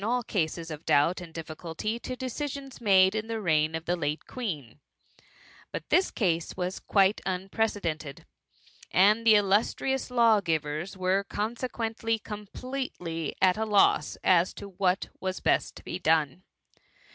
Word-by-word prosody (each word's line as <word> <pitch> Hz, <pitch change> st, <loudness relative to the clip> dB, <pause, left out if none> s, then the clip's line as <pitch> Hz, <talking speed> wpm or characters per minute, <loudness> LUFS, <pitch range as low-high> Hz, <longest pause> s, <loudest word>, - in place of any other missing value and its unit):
all 245 Hz, +3 st, 0 dB
cases 165 Hz, -5 st, -2 dB
of 155 Hz, +1 st, -7 dB
doubt 165 Hz, +6 st, +3 dB
and 170 Hz, -2 st, -9 dB
difficulty 165 Hz, +7 st, -5 dB
to 255 Hz, -, -5 dB
decisions 270 Hz, +1 st, -5 dB
made 190 Hz, -3 st, +5 dB
in 220 Hz, 0 st, -3 dB
the 225 Hz, -1 st, -3 dB
reign 155 Hz, -4 st, +1 dB
of 160 Hz, 0 st, -5 dB
the 175 Hz, -, +1 dB
late 150 Hz, -2 st, -3 dB
Queen; 155 Hz, -, -5 dB, 0.9 s
but -, -, -6 dB
this 370 Hz, -, +3 dB
case 170 Hz, -6 st, -1 dB
was 180 Hz, +1 st, -2 dB
quite 195 Hz, 0 st, +2 dB
unprecedented, 185 Hz, -6 st, -2 dB, 0.6 s
and 210 Hz, +5 st, +4 dB
the 220 Hz, -, +8 dB
illus 205 Hz, +1 st, +3 dB
trious 265 Hz, -1 st, -2 dB
lawgivers 185 Hz, -8 st, +1 dB
were 185 Hz, +1 st, +1 dB
consequently 225 Hz, +1 st, -2 dB
completely 210 Hz, -, -5 dB
at 185 Hz, 0 st, +5 dB
a -, -, +1 dB
loss 210 Hz, -2 st, +3 dB
as 180 Hz, -1 st, +3 dB
to 200 Hz, -, -8 dB
what 185 Hz, -1 st, 0 dB
was 185 Hz, 0 st, -3 dB
best -, -, +1 dB
to -, -, -12 dB
be -, -, -5 dB
done. 155 Hz, 0 st, +1 dB
190 Hz, 145 wpm, -28 LUFS, 165-225 Hz, 0.9 s, the